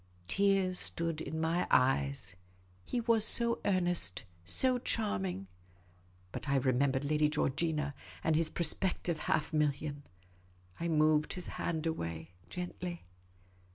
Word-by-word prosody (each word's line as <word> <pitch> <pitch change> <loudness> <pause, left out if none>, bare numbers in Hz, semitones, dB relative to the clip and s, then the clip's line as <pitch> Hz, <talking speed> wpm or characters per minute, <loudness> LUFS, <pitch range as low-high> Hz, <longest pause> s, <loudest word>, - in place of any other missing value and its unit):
Tears 195 - +1
stood 165 -1 -2
in 160 - -4
my 165 +2 0
eyes. 90 - +3 0.5
He 245 - -2
was 230 -2 +2
so 235 +1 +4
earnest, 175 - +2 0.2
so 250 - +3
charming. 95 - -2 0.9
But 140 - -6
I 140 - +2
remembered 135 +1 +1
Lady 150 +1 +2
Georgina, 150 0 -1 0.3
and 160 - +2
his 165 0 +1
prospective 170 0 +1
half 155 - 0
million. 150 -1 -1 0.8
I 170 - -2
moved 155 -1 +2
his 180 - -4
hand 160 -1 -3
away 85 - -4 0.2
gently. 180 - -6
155 Hz, 120 wpm, -32 LUFS, 140-180 Hz, 0.9 s, so